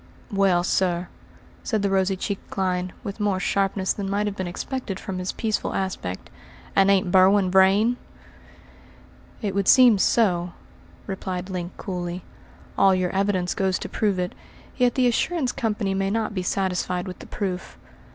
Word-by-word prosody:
"Well, 195 -3 +3
sir," 180 -1 0 0.5
said 220 -4 -1
the 200 - +2
rosy 190 0 +2
cheeked 195 +1 -4
Clyne, 185 -1 -1
with 200 -1 -6
more 205 -3 +1
sharpness 195 0 0
than 200 -2 -4
might 205 +1 0
have 205 -1 -2
been 185 -2 -3
expected 200 +2 -4
from 185 -1 -5
his 185 0 -2
peaceful 220 -2 -2
aspect, 185 - -4 0.4
"and 195 0 +5
ain't 195 -2 +3
Berwin 190 0 +5
Vrain?" 195 +6 +4 1.5
"It 200 -2 -1
would 200 0 0
seem 245 -6 +7
so," 180 -6 +2 0.5
replied 185 -1 -4
Link 180 -1 -5
coolly. 180 -2 -4 0.6
"All 195 -1 +6
your 185 -1 0
evidence 190 -2 0
goes 190 -2 0
to - - -6
prove 205 -3 0
it, 180 0 -2 0.4
yet 250 -2 +2
the 255 - +3
assurance 255 +3 +1
company 210 -3 -1
may 195 0 0
not 220 +1 -1
be 185 - -2
satisfied 180 -1 -1
with 185 -2 -7
the - - -11
proof. 190 -3 -4
195 Hz, 160 wpm, -24 LUFS, 185-205 Hz, 1.5 s, seem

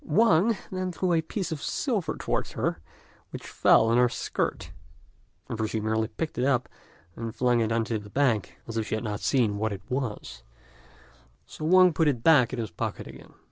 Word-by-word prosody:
Wang 225 -4 +3
then 185 -1 -2
threw 180 +1 0
a 165 - +3
piece 175 +2 -4
of 155 -3 -4
silver 210 - -1
towards - - -2
her, - - -2 0.5
which - - -8
fell - - +4
on 115 +2 +3
her 125 -1 +4
skirt; - - -3 0.8
however 110 -1 -2
she 110 - -2
merely 110 +1 0
picked 155 +2 -5
it - - +1
up, 130 -2 +1 0.5
and 115 -1 -6
flung 125 -1 +2
it 115 -1 0
on 115 0 +1
to 115 -2 -2
the 105 0 -12
bank, 120 -4 0
as 115 -1 -5
if 110 - -1
she - - -1
had 110 - -4
not 105 -2 -3
seen 110 -6 +1
what 110 0 -1
it 100 -1 -6
was, 115 - -4 1.0
so 155 - -8
Wang 185 +1 +6
put 160 +1 +2
it 125 -6 0
back 145 -8 +5
in 130 - -4
his 110 -5 -4
pocket 85 - -4
again. - - -13
125 Hz, 200 wpm, -27 LUFS, 110-160 Hz, 1.0 s, Wang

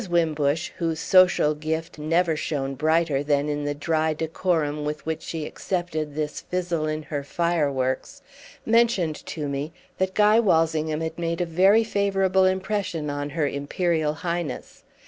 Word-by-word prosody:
Wimbush, 160 -2 +1
whose 165 -2 -1
social 180 -5 +4
gift 160 +2 -4
never 165 +2 +1
shone 140 -3 -2
brighter 155 0 +1
than 145 0 +1
in 145 0 -2
the 145 0 -1
dry 155 +1 0
decorum 160 -2 -1
with 150 +1 -4
which 160 0 -3
she 160 -2 -5
accepted 160 -6 -3
this 150 -1 -3
fizzle 175 -3 -2
in 155 0 -3
her 145 -2 -4
fireworks, 140 -5 -1 0.4
mentioned 220 -9 +2
to 150 -3 -4
me 140 +3 -3 0.3
that 190 0 0
Guy 210 +1 +5
Walsingham 160 -6 +1
had 160 +1 -4
made 170 0 -2
a 175 - +1
very 190 +7 +4
favourable 195 -3 +2
impression 185 -5 -1
on 145 0 -3
her 150 -1 0
Imperial 155 +2 -1
Highness. 170 -3 -4
160 Hz, 145 wpm, -24 LUFS, 150-175 Hz, 0.4 s, Guy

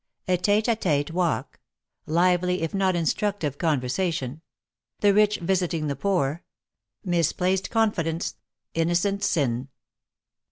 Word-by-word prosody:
A 185 - +3
TETE 205 +5 +2
A 230 - +3
TETE 150 -7 0
WALK 175 -1 -1 0.5
LIVELY 180 +2 +2
IF 165 - -2
NOT 190 -2 +2
INSTRUCTIVE 170 - -1
CONVERSATION 155 -1 -1 0.6
THE 205 -1 +5
RICH 210 0 +4
VISITING 175 -3 0
THE 140 - -1
POOR 165 -1 0 0.6
MISPLACED 180 +2 +1
CONFIDENCE 180 -8 0 0.4
INNO 165 +1 +1
CENT 200 +3 0
SIN. 130 - 0
175 Hz, 115 wpm, -25 LUFS, 160-195 Hz, 0.6 s, THE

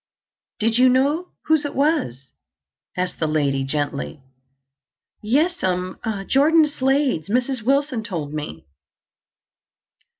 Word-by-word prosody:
"Did 225 +2 +1
you 255 0 +6
know 285 +7 +2 0.2
whose 315 -1 +3
it 290 - -5
was?" 200 - 0 0.7
asked 180 0 -2
the 160 - 0
lady 140 -3 0
gently. 145 +1 -3 1.0
"Yes'm—Jordan 225 - +1
Slade's. 270 - 0
Mrs. 250 +2 0
Wilson 270 -1 +1
told 165 -9 -5
me." 150 - -6
230 Hz, 95 wpm, -22 LUFS, -, 1.0 s, you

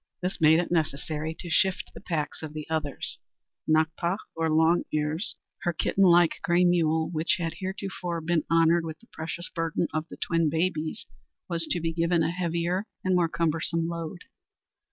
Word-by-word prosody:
This 180 -1 -3
made 160 0 +7
it 175 - -2
necessary 155 -1 -1
to 175 - -7
shift 190 +2 +2
the - - -11
packs 155 -3 -3
of 155 -2 -6
the 155 -1 -6
others. 155 -3 -2 0.5
Nakpa, 160 +3 +2 0.2
or 165 0 0
Long 160 +2 +4
Ears, 155 +4 -1 0.3
her 175 - 0
kitten 195 +4 +1
like 175 -2 +5
gray 175 +1 +3
mule, 160 -2 +2
which 160 -1 +1
had 165 -2 -2
heretofore 190 -3 -4
been 165 0 +1
honored 165 +1 +4
with 160 -1 -5
the - - -21
precious 165 +2 -5
burden 165 0 -1
of 155 +1 -2
the - - -9
twin 165 -2 +1
babies, 160 +3 -1 0.4
was 165 -2 0
to 175 - +1
be 165 0 -2
given 170 0 +2
a 160 - +1
heavier 175 +3 -1 0.2
and 185 - +2
more 175 -2 +3
cumbersome 165 0 0
load. 170 0 -5
165 Hz, 175 wpm, -27 LUFS, 160-175 Hz, 0.5 s, made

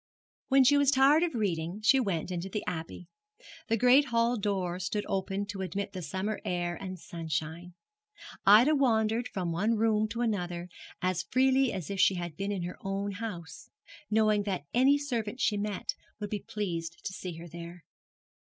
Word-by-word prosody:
When 270 0 +5
she 285 +3 +5
was 285 -2 +4
tired 280 +3 +5
of 345 -4 0
reading 180 -3 -1
she 270 +5 +5
went 185 -7 -1
into 180 +1 -3
the 210 +2 -3
Abbey. 165 0 -5 0.6
The 225 - +2
great 250 +5 +6
hall 235 -1 +2
door 190 -4 -1
stood 205 +3 -2
open 195 +1 -2
to 200 -2 -4
admit 195 +2 -3
the 185 - -5
summer 190 +5 -3
air 175 -1 -2
and 185 0 -6
sunshine. 165 +1 -5 0.7
Ida 225 +9 +7
wandered 230 -4 +2
from 180 -3 -3
one 210 +7 +1
room 215 -1 +2
to 230 +2 -4
another 180 -6 -2 0.3
as 185 -1 +1
freely 265 +1 +3
as 190 0 -5
if 195 - -4
she 190 0 +5
had 175 -3 -5
been 195 +4 -3
in 190 -3 -2
her 175 - -6
own 195 +1 -2
house, 185 -5 -7 0.4
knowing 215 -1 +3
that 190 -8 -3
any 265 +4 +5
servant 245 -5 -3
she 210 - +2
met 205 -1 -2 0.3
would 205 -1 -5
be 210 - -1
pleased 170 -5 -3
to 190 - -3
see 180 -2 -6
her 170 +1 -9
there. 170 +1 -9
200 Hz, 180 wpm, -30 LUFS, 175-230 Hz, 0.7 s, Ida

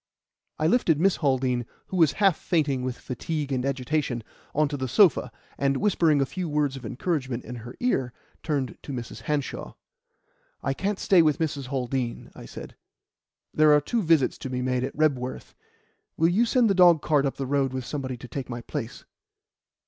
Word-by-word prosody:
I 155 - -1
lifted 165 -5 +3
Miss 190 +2 +3
Haldean, 130 -4 +1 0.3
who 190 - -3
was 160 -5 +4
half 195 -4 +3
fainting 145 -8 0
with 125 -1 -3
fatigue 145 +3 -4
and 130 -2 0
agitation, 135 -2 -1 0.3
on 155 +1 +3
to 145 - -3
the 130 -2 -3
sofa, 170 - +4 0.3
and, 140 -1 +2
whispering 170 -7 +3
a - - +3
few 180 +4 -4
words 145 -2 0
of 130 -4 -7
encouragement 130 -1 -2
into 125 -1 -7
her 120 +2 -9
ear, 135 - 0 0.3
turned 140 -6 -2
to 140 - -7
Mrs. 120 -3 -6
Hanshaw. 150 -2 -3 0.9
"I 135 - 0
can't 195 +7 -2
stay 190 -3 +4
with 155 -3 +3
Mrs. 145 -5 -2
Haldean," 125 -2 -3
I - - -11
said. - - -9 0.8
"There 155 -1 +5
are 150 - +6
two 225 +10 -1
visits 160 -7 +2
to 130 - -5
be 125 0 -2
made 125 0 0
at 135 - -5
Rebworth. 130 -5 -1 0.6
Will 165 +1 +4
you 220 +7 +2
send 245 -1 +3
the 200 - +3
dogcart 155 -6 +4
up 135 - -4
the 135 - -3
road 135 -1 +1
with 130 -1 -4
somebody 130 -3 -4
to 125 - -10
take 135 +1 -6
my 120 -1 -5
place?" 115 +1 -6
140 Hz, 185 wpm, -26 LUFS, 130-160 Hz, 0.9 s, are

